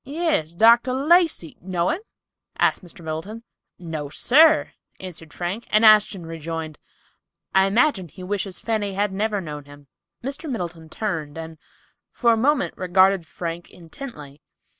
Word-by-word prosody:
"Yes, 285 Hz, -, -1 dB
Dr. 235 Hz, +6 st, +5 dB
Lacey; 305 Hz, -, +2 dB
know 180 Hz, -1 st, -1 dB
him?" 365 Hz, -, -3 dB, 0.6 s
asked -, -, +2 dB
Mr. 170 Hz, -1 st, -12 dB
Middleton. 190 Hz, +9 st, -5 dB, 0.3 s
"No, 160 Hz, -4 st, -6 dB
sir," 305 Hz, -, +4 dB, 0.3 s
answered 170 Hz, -4 st, -8 dB
Frank, 180 Hz, +6 st, -4 dB
and 215 Hz, +1 st, +4 dB
Ashton 210 Hz, -4 st, +5 dB
rejoined, 165 Hz, -1 st, -6 dB, 0.7 s
"I 190 Hz, 0 st, +5 dB
imagine 220 Hz, -, +2 dB
he 180 Hz, +4 st, -12 dB
wishes 195 Hz, 0 st, -3 dB
Fanny 215 Hz, -3 st, -2 dB
had 205 Hz, 0 st, 0 dB
never 210 Hz, +1 st, -1 dB
known 150 Hz, -4 st, -7 dB
him." 145 Hz, 0 st, -15 dB, 0.4 s
Mr. 280 Hz, +4 st, -5 dB
Middleton 170 Hz, -8 st, -5 dB
turned, 160 Hz, -7 st, -4 dB
and 160 Hz, -1 st, -8 dB, 0.5 s
for 235 Hz, -2 st, +2 dB
a -, -, +3 dB
moment 280 Hz, +5 st, +1 dB
regarded 185 Hz, -1 st, +3 dB
Frank 170 Hz, +1 st, -6 dB
intently. 160 Hz, -, -11 dB
190 Hz, 140 wpm, -23 LUFS, 165-230 Hz, 0.7 s, Dr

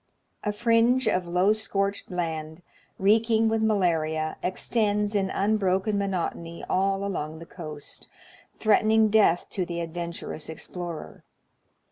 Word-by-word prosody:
A 210 Hz, -, 0 dB
fringe 230 Hz, +3 st, +3 dB
of 185 Hz, -4 st, +1 dB
low 180 Hz, +4 st, +3 dB
scorched 200 Hz, -2 st, -2 dB
land, 160 Hz, -2 st, -4 dB, 0.3 s
reeking 225 Hz, +3 st, +3 dB
with 220 Hz, 0 st, +1 dB
malaria, 165 Hz, -7 st, +1 dB
extends 210 Hz, +2 st, 0 dB
in 195 Hz, -2 st, +1 dB
unbroken 200 Hz, 0 st, +1 dB
monotony 170 Hz, -3 st, -3 dB
all 195 Hz, +1 st, +1 dB
along 160 Hz, -5 st, -3 dB
the 165 Hz, -, -10 dB
coast, 155 Hz, -4 st, -8 dB, 0.5 s
threatening 220 Hz, 0 st, +4 dB
death 205 Hz, -5 st, +4 dB
to 185 Hz, -, -1 dB
the 170 Hz, -1 st, -5 dB
adventur 170 Hz, 0 st, -5 dB
ous 155 Hz, -, -8 dB
explorer. 170 Hz, +1 st, -7 dB
195 Hz, 120 wpm, -26 LUFS, 170-215 Hz, 0.5 s, threatening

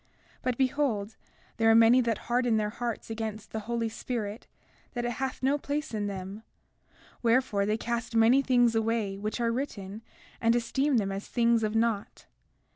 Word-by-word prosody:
33:2 -, -, -37 dB, 0.3 s
But 250 Hz, -2 st, -1 dB
behold, 255 Hz, -6 st, 0 dB, 0.4 s
there 225 Hz, 0 st, +4 dB
are 225 Hz, -, +6 dB
many 230 Hz, +3 st, +7 dB
that 230 Hz, -2 st, 0 dB
harden 240 Hz, -2 st, +2 dB
their 210 Hz, -1 st, 0 dB
hearts 235 Hz, 0 st, -4 dB
against 220 Hz, -1 st, -5 dB
the 220 Hz, -, -3 dB
Holy 235 Hz, -1 st, 0 dB
Spirit, 225 Hz, -1 st, -5 dB, 0.5 s
that 240 Hz, -2 st, -2 dB
it 240 Hz, -, -1 dB
hath 265 Hz, +2 st, -4 dB
no 280 Hz, +3 st, +2 dB
place 295 Hz, 0 st, -3 dB
in 210 Hz, -1 st, -1 dB
them; 195 Hz, +1 st, -6 dB, 0.8 s
wherefore, 230 Hz, -4 st, +2 dB
they 215 Hz, +1 st, +1 dB
cast 235 Hz, 0 st, -3 dB
many 230 Hz, +4 st, +5 dB
things 245 Hz, -3 st, +3 dB
away 220 Hz, -3 st, 0 dB
which 215 Hz, +3 st, -3 dB
are 230 Hz, -1 st, +1 dB
written 220 Hz, -5 st, -4 dB, 0.4 s
and 230 Hz, 0 st, +3 dB
esteem 265 Hz, +3 st, +1 dB
them 195 Hz, -3 st, 0 dB
as 195 Hz, +1 st, -5 dB
things 235 Hz, -1 st, +2 dB
of 215 Hz, 0 st, -1 dB
naught. 225 Hz, -2 st, -1 dB
230 Hz, 175 wpm, -28 LUFS, 215-245 Hz, 0.8 s, many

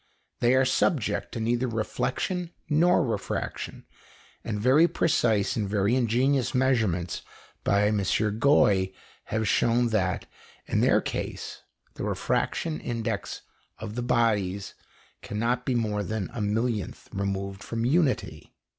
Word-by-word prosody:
They 120 Hz, +2 st, +4 dB
are 130 Hz, 0 st, +4 dB
subject 130 Hz, -1 st, +1 dB
to -, -, -4 dB
neither 120 Hz, +3 st, 0 dB
reflection 130 Hz, -, -2 dB, 0.2 s
nor 170 Hz, +1 st, +4 dB
refraction, 115 Hz, -, -4 dB, 0.6 s
and 105 Hz, -2 st, -3 dB
very 135 Hz, +9 st, +5 dB
precise 110 Hz, -, +1 dB
and 105 Hz, -3 st, -1 dB
very 100 Hz, +3 st, +2 dB
ingenious 130 Hz, +2 st, +1 dB
measurements 110 Hz, -10 st, +1 dB, 0.4 s
by 100 Hz, +1 st, +3 dB
M. 105 Hz, 0 st, +2 dB, 0.4 s
Gouy 100 Hz, -9 st, +4 dB, 0.3 s
have 110 Hz, 0 st, -1 dB
shown 120 Hz, +1 st, +3 dB
that, 95 Hz, -5 st, 0 dB, 0.4 s
in -, -, 0 dB
their -, -, +4 dB
case, -, -, -5 dB, 0.3 s
the -, -, -6 dB
refraction 160 Hz, -2 st, -1 dB
index 115 Hz, -5 st, -3 dB, 0.3 s
of 105 Hz, -, -6 dB
the 120 Hz, -, -3 dB
various 105 Hz, -6 st, +1 dB
bodies -, -, -23 dB, 0.5 s
cannot 115 Hz, +5 st, -2 dB
be 130 Hz, -, +1 dB
more 105 Hz, -3 st, 0 dB
than 105 Hz, -2 st, -3 dB
a 120 Hz, -, -4 dB
millionth 105 Hz, -1 st, -2 dB
removed 100 Hz, 0 st, -3 dB
from 115 Hz, 0 st, -3 dB
unity. 145 Hz, 0 st, 0 dB
115 Hz, 130 wpm, -27 LUFS, 105-130 Hz, 0.6 s, very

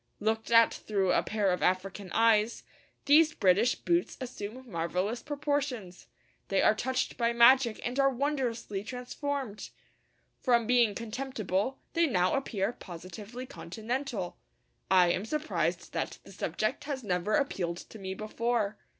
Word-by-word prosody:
Looked 220 Hz, +1 st, -1 dB
at 230 Hz, -1 st, +6 dB
through 195 Hz, -3 st, 0 dB
a -, -, +3 dB
pair 210 Hz, -3 st, 0 dB
of 180 Hz, -, -1 dB
African 185 Hz, +1 st, -1 dB
eyes, 225 Hz, +1 st, +3 dB, 0.4 s
these 315 Hz, +2 st, +5 dB
British 200 Hz, +6 st, +3 dB
boots 345 Hz, +1 st, 0 dB
assume 250 Hz, 0 st, -7 dB
marvellous 180 Hz, +7 st, -1 dB
proportions. 285 Hz, -10 st, -3 dB, 0.4 s
They 195 Hz, -, +1 dB
are -, -, +6 dB
touched 255 Hz, +3 st, -2 dB
by 235 Hz, -1 st, +1 dB
magic 235 Hz, 0 st, +6 dB
and 245 Hz, +3 st, -2 dB
are 275 Hz, 0 st, +5 dB
wondrously 250 Hz, -7 st, -2 dB
transformed. 250 Hz, -1 st, -4 dB, 0.7 s
From 240 Hz, -3 st, +3 dB
being 235 Hz, -3 st, +3 dB
contemptible, 230 Hz, -1 st, -2 dB, 0.2 s
they 335 Hz, -1 st, +3 dB
now 185 Hz, -8 st, +2 dB
appear 225 Hz, -6 st, -1 dB
positively 200 Hz, +8 st, -9 dB
continental. 230 Hz, -1 st, -4 dB, 0.5 s
I 180 Hz, -2 st, +5 dB
am 185 Hz, -, -1 dB
surprised 305 Hz, +7 st, -2 dB
that -, -, -3 dB
the -, -, -14 dB
subject -, -, -2 dB
has 275 Hz, -3 st, -4 dB
never 185 Hz, +1 st, 0 dB
appealed 185 Hz, -, -1 dB
to 220 Hz, -, -11 dB
me 190 Hz, -1 st, -5 dB
before. 215 Hz, 0 st, -1 dB
230 Hz, 135 wpm, -30 LUFS, 195-260 Hz, 0.7 s, at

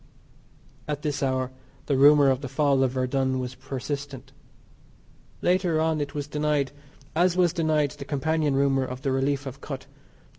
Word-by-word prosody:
At 150 Hz, -1 st, -3 dB
this 145 Hz, -2 st, -2 dB
hour 130 Hz, -1 st, 0 dB, 0.3 s
the 140 Hz, -, +1 dB
rumour 145 Hz, 0 st, +6 dB
of 130 Hz, 0 st, -1 dB
the 135 Hz, -, -5 dB
fall 140 Hz, 0 st, +2 dB
of 130 Hz, -, +3 dB
Verdun 130 Hz, 0 st, 0 dB
was 125 Hz, 0 st, -4 dB
persistent. 140 Hz, 0 st, -6 dB, 1.1 s
Later 180 Hz, -3 st, +2 dB
on 160 Hz, -1 st, +1 dB
it 145 Hz, 0 st, -4 dB
was 145 Hz, -1 st, -2 dB
denied, 150 Hz, -1 st, 0 dB, 0.4 s
as 175 Hz, +2 st, +3 dB
was 175 Hz, -3 st, +3 dB
denied 155 Hz, -4 st, +1 dB
the 140 Hz, +1 st, -9 dB
companion 150 Hz, 0 st, 0 dB
rumour 135 Hz, -1 st, +2 dB
of 130 Hz, +1 st, -6 dB
the 135 Hz, -, 0 dB
relief 135 Hz, +1 st, 0 dB
of 135 Hz, +1 st, -8 dB
Kut. 135 Hz, -3 st, -6 dB
140 Hz, 160 wpm, -26 LUFS, 135-150 Hz, 1.1 s, rumour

